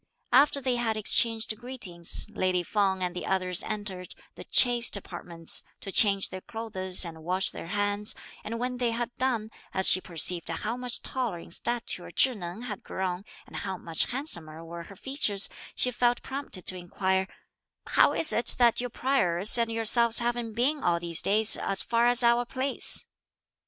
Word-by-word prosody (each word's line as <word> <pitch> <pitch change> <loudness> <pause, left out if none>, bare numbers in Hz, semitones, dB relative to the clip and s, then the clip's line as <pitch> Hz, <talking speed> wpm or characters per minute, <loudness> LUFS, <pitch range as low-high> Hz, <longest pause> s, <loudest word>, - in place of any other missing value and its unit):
After 280 +2 +4
they 255 -2 -1
had 225 -2 -1
exchanged 225 +1 +1
greetings, 215 -11 -1
lady 185 -4 -1
Feng 190 -1 -1
and 180 -1 -4
the 180 - -6
others 185 0 -1
entered 200 -4 -6 0.2
the - - -11
"chaste" 240 -4 +2
apartments 170 -4 -5 0.2
to 195 - -8
change 195 -1 +3
their 185 - -8
clothes 190 -5 -1
and 160 -1 -10
wash 185 +2 -1
their - - -9
hands; 205 +2 +2 0.3
and 230 +2 -6
when 250 +1 -4
they 245 -1 -1
had 235 +1 -4
done, 235 -4 -2 0.2
as 190 0 +3
she 185 - +5
perceived 170 0 0
how 210 +8 -4
much 250 -1 -1
taller 245 -8 -3
in 170 - -13
stature 235 -3 -1
Chih 260 +8 +1
Neng 180 +3 -8
had 210 -5 -7
grown 185 0 -5 0.2
and - - -10
how 190 -2 -5
much 165 -2 -2
handsomer 170 - -3
were 170 0 -9
her 200 - -14
features, 215 -4 +1 0.3
she 250 - +7
felt 245 0 0
prompted 270 -9 -5
to 185 - -2
inquire, 190 +2 -2 0.6
"How - - +3
is 325 - +2
it 235 - +8
that 240 -1 +3
your 245 - -4
prioress 210 -8 0
and 230 -1 -1
yourselves 230 +1 +2
haven't 240 -1 -1
been 275 +6 -1
all 170 -1 0
these 170 -1 +1
days 215 +2 +5
as 195 - -1
far 235 +1 +1
as 245 0 +5
our 235 +1 +3
place?" 265 +2 +4
210 Hz, 175 wpm, -26 LUFS, 180-240 Hz, 0.6 s, it